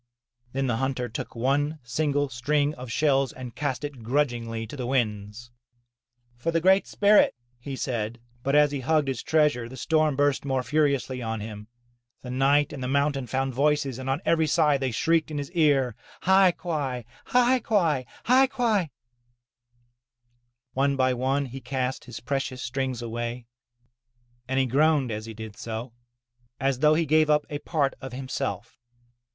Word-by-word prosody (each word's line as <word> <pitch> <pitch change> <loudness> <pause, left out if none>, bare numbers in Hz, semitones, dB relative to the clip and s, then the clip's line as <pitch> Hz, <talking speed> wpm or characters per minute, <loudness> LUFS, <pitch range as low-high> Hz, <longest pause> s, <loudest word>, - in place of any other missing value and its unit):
Then 135 +1 0
the 120 -3 0
hunter 130 -1 -1
took 115 - -6
one 145 +6 0
single 145 +4 0
string 145 +4 0
of 125 -4 -8
shells 135 0 +2
and 125 -3 -9
cast 145 -2 -2
it 145 -4 -6
grudgingly 115 -3 -1
to 115 - -9
the 125 -3 -4
winds. 110 -2 -2 0.9
'Tor 165 - -1
the 165 - +2
Great 190 +3 +4
Spirit," 205 0 +4 0.2
he 135 +2 -6
said. 120 -3 -3 0.2
But 140 +3 0
as 150 -1 +5
he 140 - -2
hugged 150 +1 +1
his 130 -4 -3
treasure 150 -7 +2
the 130 - -10
storm 155 +1 +2
burst 145 0 +1
more 135 -2 -1
furiously 140 -2 0
on 110 -1 -3
him. 105 0 -8 0.6
The 125 - -6
night 140 +4 +2
and 140 - -6
the - - -2
mountain 140 -1 0
found 135 +1 -1
voices 140 -1 +1
and 130 0 -4
on 135 +5 0
every 160 -1 +3
side 150 -3 +3
they 135 -1 0
shrieked 160 +7 +1
in 150 - -4
his 145 +2 -4
ear, 145 - +2 0.3
*'Hai 190 -1 +5
quai! 140 -10 -3 0.2
Hai 250 +1 +3
quai! 165 - +1 0.2
Hai 260 +2 +5
quai!*' 220 - 0 1.8
One 140 +1 +1
by 130 -1 +2
one, 135 +3 0
he 130 +1 -8
cast 130 -1 -3
his 120 - -8
precious 130 0 -3
strings 130 -1 -3
away, 120 +1 -4 1.0
and 130 +1 0
he 135 - +3
groaned 140 0 +2
as 110 +1 -5
he 110 - -8
did 110 -1 -8
so, 115 +2 -6 0.7
as 135 -1 0
though 150 +2 +5
he 165 +1 +1
gave 155 +1 +3
up 150 0 +3
a 145 - -3
part 145 -4 0
of 130 -2 -7
himself. 130 -6 -4
135 Hz, 170 wpm, -26 LUFS, 125-150 Hz, 1.8 s, as